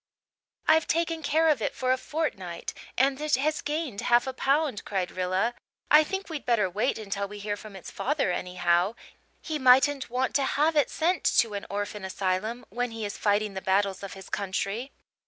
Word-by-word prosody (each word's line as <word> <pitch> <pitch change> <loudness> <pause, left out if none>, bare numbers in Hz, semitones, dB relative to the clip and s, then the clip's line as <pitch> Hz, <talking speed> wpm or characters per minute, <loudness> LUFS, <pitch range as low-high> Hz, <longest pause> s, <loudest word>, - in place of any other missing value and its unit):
"I've 320 0 +5
taken 330 0 0
care 315 +2 +2
of 295 -7 +3
it - - -1
for 255 0 0
a 260 - +3
fortnight 190 - -3 0.2
and 270 +2 +2
it 305 0 +2
has 300 +4 0
gained 295 -8 -3
half 240 0 +4
a 265 - -3
pound," 275 -3 +1
cried 190 -3 -2
Rilla. 185 +5 0 0.4
"I 300 +1 +8
think 385 +5 -4
we'd 315 -4 -5
better 230 -5 +2
wait 210 +8 0
until 200 -2 -3
we 210 +1 -9
hear 205 0 -3
from 205 -1 -11
its 190 - -9
father 280 -8 0
anyhow. 180 +2 +1 0.5
He 310 -2 -3
mightn't 265 +1 +5
want 255 +2 -1
to 280 - 0
have 300 +4 +2
it 290 -5 +3
sent 345 +3 0
to 225 -3 +4
an 200 - -5
orphan 205 0 -4
asylum, 190 +5 -2
when 245 +4 -2
he 225 -1 -5
is 205 - -4
fighting 205 0 +1
the 190 - -5
battles 195 0 +1
of 195 -2 -6
his 190 -1 -11
country." 200 +5 -3
235 Hz, 190 wpm, -27 LUFS, 200-290 Hz, 0.5 s, I